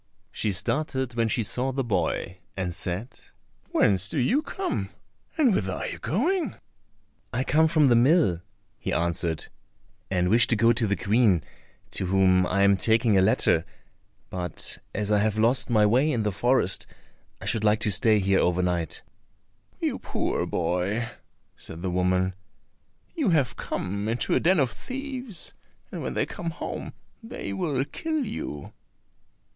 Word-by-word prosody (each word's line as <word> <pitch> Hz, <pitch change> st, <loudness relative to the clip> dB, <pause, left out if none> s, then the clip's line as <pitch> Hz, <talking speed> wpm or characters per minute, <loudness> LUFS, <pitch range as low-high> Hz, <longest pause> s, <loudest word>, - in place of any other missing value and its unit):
She 105 Hz, -, -1 dB
started 130 Hz, -, -1 dB
when 115 Hz, -1 st, +1 dB
she 115 Hz, +1 st, 0 dB
saw 125 Hz, +8 st, -1 dB
the 135 Hz, +1 st, -1 dB
boy, 90 Hz, -3 st, -2 dB, 0.2 s
and 90 Hz, -2 st, -2 dB
said, 95 Hz, +9 st, -5 dB, 0.5 s
"Whence 95 Hz, -2 st, +2 dB
do -, -, -4 dB
you 235 Hz, -, +2 dB
come, 375 Hz, +3 st, -3 dB, 0.5 s
and 270 Hz, -9 st, +4 dB
whither 95 Hz, -, -1 dB
are -, -, -4 dB
you -, -, -5 dB
going?" 305 Hz, -, 0 dB, 0.8 s
"I 125 Hz, +3 st, -1 dB
come 160 Hz, +4 st, +3 dB
from 155 Hz, -3 st, +4 dB
the 120 Hz, -, +5 dB
mill," 120 Hz, -, +4 dB, 0.4 s
he -, -, -3 dB
answered, 85 Hz, -1 st, -1 dB, 0.6 s
"and 90 Hz, -2 st, +1 dB
wish 115 Hz, +3 st, +5 dB
to 115 Hz, -, +2 dB
go 115 Hz, +2 st, +4 dB
to 115 Hz, -1 st, +1 dB
the 100 Hz, -, +1 dB
Queen, 100 Hz, -, +2 dB, 0.5 s
to 95 Hz, -, -2 dB
whom 95 Hz, -1 st, +3 dB
I 100 Hz, +1 st, +2 dB
am 100 Hz, 0 st, +5 dB
taking 110 Hz, +2 st, +3 dB
a 95 Hz, -, +5 dB
letter; 85 Hz, -3 st, +3 dB, 0.7 s
but 90 Hz, -3 st, -3 dB, 0.2 s
as 105 Hz, 0 st, -1 dB
I 105 Hz, -, +4 dB
have 110 Hz, 0 st, 0 dB
lost 120 Hz, +4 st, +4 dB
my 110 Hz, -3 st, +4 dB
way 130 Hz, +8 st, +3 dB
in 115 Hz, -5 st, 0 dB
the 105 Hz, -, 0 dB
forest 120 Hz, -1 st, +1 dB, 0.5 s
I -, -, -9 dB
should 110 Hz, -2 st, 0 dB
like 105 Hz, 0 st, +3 dB
to 105 Hz, -, +3 dB
stay 105 Hz, +4 st, +5 dB
here 95 Hz, -1 st, +2 dB
over 90 Hz, +1 st, +1 dB
night." 85 Hz, -3 st, -2 dB, 0.8 s
"You -, -, -1 dB
poor -, -, -2 dB
boy," 90 Hz, +7 st, -1 dB, 0.4 s
said 80 Hz, +2 st, -9 dB
the 95 Hz, -, -1 dB
woman, 90 Hz, +1 st, +1 dB, 0.8 s
"you 300 Hz, -, 0 dB
have 140 Hz, -7 st, +2 dB
come 100 Hz, +3 st, -3 dB
into 115 Hz, +2 st, -1 dB
a -, -, +4 dB
den 175 Hz, +1 st, +3 dB
of 130 Hz, -4 st, +2 dB
thieves, 255 Hz, -, -6 dB, 0.4 s
and -, -, -5 dB
when -, -, -4 dB
they -, -, +1 dB
come 170 Hz, -, -5 dB
home 165 Hz, -, -6 dB, 0.3 s
they 225 Hz, -, -6 dB
will 135 Hz, -, -1 dB
kill 315 Hz, -, -3 dB
you." 75 Hz, -, -6 dB
110 Hz, 160 wpm, -26 LUFS, 95-135 Hz, 0.8 s, the